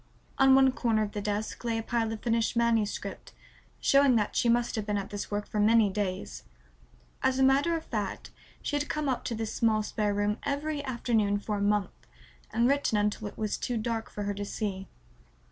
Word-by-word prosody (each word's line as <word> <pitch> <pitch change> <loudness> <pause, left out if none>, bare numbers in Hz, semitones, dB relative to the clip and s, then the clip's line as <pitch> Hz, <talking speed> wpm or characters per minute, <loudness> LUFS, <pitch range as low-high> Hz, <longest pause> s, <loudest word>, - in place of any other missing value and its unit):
On 270 0 +7
one 265 0 +6
corner 225 -4 +1
of 205 - -4
the 205 - -4
desk 210 +2 -3
lay 230 -1 0
a 225 - -3
pile 225 -1 -1
of 225 - -5
finished 230 -1 0
manuscript, 230 -3 -1 0.5
showing 275 -2 +4
that 210 -2 0
she 235 - +2
must 240 +1 +2
have 215 - -1
been 210 -1 0
at 195 -1 -5
this 205 -1 -5
work 205 0 -3
for 210 - -3
many 215 -1 +4
days. 185 - -3 0.8
As 260 0 +2
a 265 - +3
matter 280 +6 +3
of 320 - -8
fact 210 -5 -4 0.3
she - - -2
had 290 0 -1
come 305 -1 -1
up 260 -2 -1
to 235 - -2
this 220 -1 -3
small 215 -2 +2
spare 210 -1 -1
room 205 +1 0
every 290 +1 -2
afternoon 230 -6 0
for 205 +1 -3
a - - -3
month 205 0 +1 0.6
and 235 +2 +2
written 280 -5 +2
until 210 0 0
it - - -10
was 215 -2 -1
too 245 - -2
dark 225 0 -2
for 205 - -5
her 205 0 -1
to 200 +1 -5
see. 195 -2 -4
220 Hz, 210 wpm, -29 LUFS, 205-245 Hz, 0.8 s, On